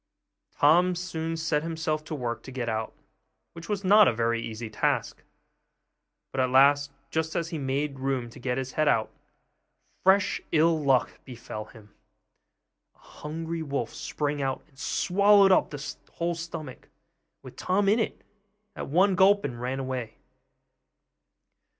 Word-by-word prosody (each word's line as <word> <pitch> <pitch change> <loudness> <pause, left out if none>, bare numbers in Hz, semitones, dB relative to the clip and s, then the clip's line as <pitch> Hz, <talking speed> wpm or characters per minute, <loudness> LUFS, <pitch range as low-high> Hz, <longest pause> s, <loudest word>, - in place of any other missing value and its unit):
Tom 175 +5 +5
soon 165 -2 -4
set 160 -2 0
himself 160 -1 -2
to 160 - -5
work 120 -4 -3
to 130 - -11
get 125 -2 -4
out, 110 -1 -2 0.6
which 165 +3 -11
was 205 -1 -2
not 205 +2 +7
a - - +4
very 115 0 0
easy 115 0 -6
task; 110 - -1 1.1
but 130 - -1
at 130 - +1
last, 140 +2 +4 0.2
just 160 0 -2
as 165 -1 -1
he 165 - -4
had 140 - -5
made 140 +1 -2
room 130 -2 -1
to - - -13
get 125 0 -2
his 130 -1 -3
head 155 +3 0
out, 110 -6 +2 0.9
fresh 190 +1 +3
ill 160 -1 +3
luck 135 -3 +1
befell 115 -4 -8
him. 105 -2 -17 1.0
A - - -31
hungry 165 +2 -6
wolf 140 -6 -3
sprang 145 -1 -3
out, 135 -1 -2
and 140 -3 -23
swallowed 200 +5 +4
up 185 - +4
the 145 0 -6 0.2
whole 170 0 -1
stomach, 165 -5 -8 0.5
with - - -11
Tom 195 +2 0
in 210 +4 +4
it, 225 - -3 0.5
at - - -5
one 185 +7 +3
gulp, 195 +1 +4
and 120 -4 -5
ran 130 +2 -2
away. 130 -3 -4
150 Hz, 155 wpm, -27 LUFS, 130-170 Hz, 1.1 s, not